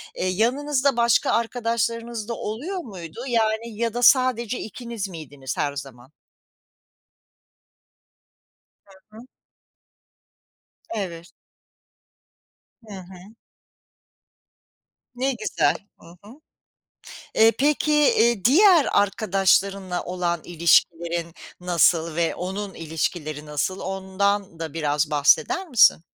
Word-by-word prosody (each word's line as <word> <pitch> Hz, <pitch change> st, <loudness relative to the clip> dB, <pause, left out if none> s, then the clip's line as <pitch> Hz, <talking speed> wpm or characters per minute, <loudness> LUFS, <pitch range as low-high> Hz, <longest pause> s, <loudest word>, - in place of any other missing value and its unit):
eee, 185 Hz, -, -2 dB
yanınızda 260 Hz, +7 st, 0 dB
başka 235 Hz, 0 st, +3 dB
arkadaşlarınız 230 Hz, -1 st, -2 dB
da -, -, -1 dB
oluyor 255 Hz, -, -5 dB
muydu? 190 Hz, -, -9 dB
Yani 225 Hz, -1 st, 0 dB
ya 230 Hz, -1 st, -1 dB
da 245 Hz, -, -3 dB
sadece 250 Hz, -2 st, +3 dB
ikiniz 230 Hz, -1 st, -6 dB
miydiniz 145 Hz, -6 st, -8 dB
her 145 Hz, -1 st, -1 dB
zaman? 135 Hz, -2 st, -10 dB, 3.0 s
Hı 215 Hz, -, -15 dB
hı. -, -, -10 dB, 1.7 s
Evet. 175 Hz, -5 st, -6 dB, 1.6 s
Hı 205 Hz, -, -9 dB
hı. 185 Hz, +4 st, -14 dB, 1.8 s
Ne 265 Hz, +2 st, 0 dB
güzel. 220 Hz, -3 st, 0 dB, 0.2 s
Hı -, -, -17 dB, 0.2 s
hı. 240 Hz, +9 st, -15 dB, 0.9 s
Eee, 225 Hz, +1 st, +6 dB
peki, 300 Hz, +2 st, +1 dB
iii, 235 Hz, -8 st, +3 dB
diğer 340 Hz, -, +6 dB
arkadaşlarınla 195 Hz, -2 st, +1 dB
olan 175 Hz, -2 st, -2 dB
ilişkilerin 170 Hz, 0 st, +1 dB, 0.3 s
nasıl? 170 Hz, -2 st, +2 dB
Ve 170 Hz, 0 st, 0 dB
onun 195 Hz, +3 st, -5 dB
ilişkileri 155 Hz, -1 st, -4 dB
nasıl? 150 Hz, +6 st, -3 dB
Ondan 195 Hz, -1 st, -2 dB
da 160 Hz, -2 st, -5 dB
biraz 150 Hz, -1 st, -1 dB
bahseder 365 Hz, -, +2 dB
misin? 225 Hz, -, +5 dB
200 Hz, 95 wpm, -23 LUFS, 170-235 Hz, 3.0 s, Eee